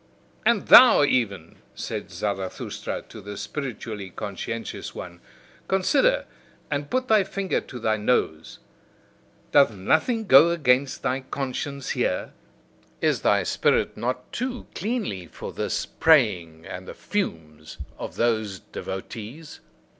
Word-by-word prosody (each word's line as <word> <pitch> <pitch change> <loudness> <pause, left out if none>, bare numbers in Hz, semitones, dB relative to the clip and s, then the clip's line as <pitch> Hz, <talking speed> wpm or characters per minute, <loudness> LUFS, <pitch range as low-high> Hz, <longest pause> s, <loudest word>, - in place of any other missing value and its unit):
"And 235 -4 +3
thou 245 - +9
even," 100 - 0 0.2
said - - -5
Zarathustra 95 -3 -4
to - - -12
the 100 0 -8
spiritually 110 -4 -5
conscientious 105 +4 -6
one, 85 -1 -8 0.5
"consider, 300 - +2 0.5
and 145 0 -2
put 255 0 0
thy 215 -3 +5
finger 195 0 -2
to 125 - -10
thy 110 -2 0
nose! 80 -8 0 0.9
Doth 140 -4 +6
nothing 160 - +1
go 150 -1 +8
against 135 -5 +1
thy 130 +1 0
conscience 135 +1 -4
here? - - -1 0.7
Is - - +1
thy - - +3
spirit - - +1
not 125 +1 -3
too 250 0 -3
cleanly 195 - -3
for - - -8
this - - -2
praying 95 - +2
and 90 +2 -8
the - - -8
fumes 80 - -4 0.2
of - - -6
those 110 -4 0
devotees?" 115 +10 -8
125 Hz, 120 wpm, -25 LUFS, 100-170 Hz, 0.9 s, thou